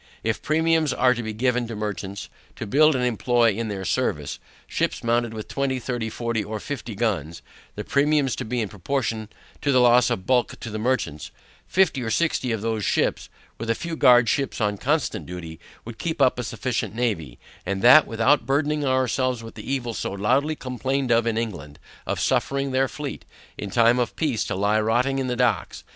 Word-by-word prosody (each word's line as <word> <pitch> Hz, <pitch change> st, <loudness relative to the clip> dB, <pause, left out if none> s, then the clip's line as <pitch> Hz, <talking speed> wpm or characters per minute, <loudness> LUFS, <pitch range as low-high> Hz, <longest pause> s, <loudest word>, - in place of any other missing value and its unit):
If 110 Hz, 0 st, -1 dB
premiums 160 Hz, -1 st, +2 dB
were 125 Hz, 0 st, +4 dB
to 120 Hz, -, -4 dB
be 110 Hz, -1 st, -4 dB
given 125 Hz, +2 st, 0 dB
to 115 Hz, -, -6 dB
merchants, 100 Hz, -2 st, -5 dB, 0.3 s
to -, -, -5 dB
build 150 Hz, +7 st, +4 dB
and 125 Hz, -1 st, 0 dB
employ 120 Hz, 0 st, +2 dB
in 115 Hz, +3 st, -3 dB
their 100 Hz, -2 st, -4 dB
service, -, -, -1 dB, 0.3 s
ships -, -, -2 dB
mounted 120 Hz, 0 st, +1 dB
with 110 Hz, -1 st, -7 dB
twenty, 140 Hz, -1 st, -1 dB
thirty, 120 Hz, -2 st, -3 dB
forty, 115 Hz, -1 st, -2 dB
or 110 Hz, 0 st, -5 dB
fifty 120 Hz, -3 st, -6 dB
guns, 95 Hz, -8 st, -2 dB, 0.3 s
(the -, -, -4 dB
premiums 140 Hz, -2 st, +2 dB
to -, -, -3 dB
be 120 Hz, +2 st, -2 dB
in 110 Hz, -, -1 dB
proportion 110 Hz, +2 st, -3 dB, 0.3 s
to 140 Hz, -, +1 dB
the 130 Hz, -, +4 dB
loss 125 Hz, -1 st, +5 dB
of 95 Hz, -, -2 dB
bulk 125 Hz, 0 st, +1 dB
to 115 Hz, -, -6 dB
the 110 Hz, -, -4 dB
merchants) 105 Hz, -, -1 dB, 0.4 s
fifty 185 Hz, -8 st, +2 dB
or 115 Hz, -, -3 dB
sixty 130 Hz, -2 st, 0 dB
of 110 Hz, -2 st, -2 dB
those 110 Hz, -2 st, -1 dB
ships, -, -, 0 dB, 0.3 s
with 115 Hz, +1 st, -5 dB
a 115 Hz, -, +2 dB
few 170 Hz, +4 st, -5 dB
guard 120 Hz, -5 st, +6 dB
ships 140 Hz, +3 st, -1 dB
on 105 Hz, -3 st, 0 dB
constant 130 Hz, -, -1 dB
duty, 85 Hz, -2 st, -8 dB, 0.3 s
would 115 Hz, 0 st, -9 dB
keep 160 Hz, -3 st, -3 dB
up 130 Hz, -2 st, +3 dB
a -, -, -2 dB
sufficient 120 Hz, -1 st, -3 dB
navy, 95 Hz, -, -2 dB, 0.3 s
and 95 Hz, +2 st, -3 dB
that 135 Hz, +5 st, +8 dB
without 115 Hz, +6 st, +2 dB
burdening 145 Hz, +2 st, +1 dB
ourselves 130 Hz, -2 st, 0 dB
with 115 Hz, -, -9 dB
the -, -, -7 dB
evil 120 Hz, -4 st, -2 dB
so -, -, -3 dB
loudly 130 Hz, +10 st, +1 dB
complained 130 Hz, 0 st, -2 dB
of 115 Hz, 0 st, +3 dB
in 115 Hz, -1 st, 0 dB
England, 85 Hz, -11 st, -4 dB, 0.3 s
of -, -, -1 dB
suffering 140 Hz, 0 st, 0 dB
their 130 Hz, +1 st, +2 dB
fleet, 145 Hz, +3 st, -6 dB, 0.3 s
in 105 Hz, -, -6 dB
time 115 Hz, +3 st, +4 dB
of 120 Hz, -2 st, -1 dB
peace 140 Hz, -9 st, 0 dB
to -, -, -3 dB
lie 105 Hz, +3 st, +2 dB
rotting 125 Hz, +5 st, +1 dB
in 130 Hz, -, -1 dB
the 125 Hz, -, -1 dB
docks. 120 Hz, -6 st, 0 dB
120 Hz, 200 wpm, -24 LUFS, 110-135 Hz, 0.4 s, that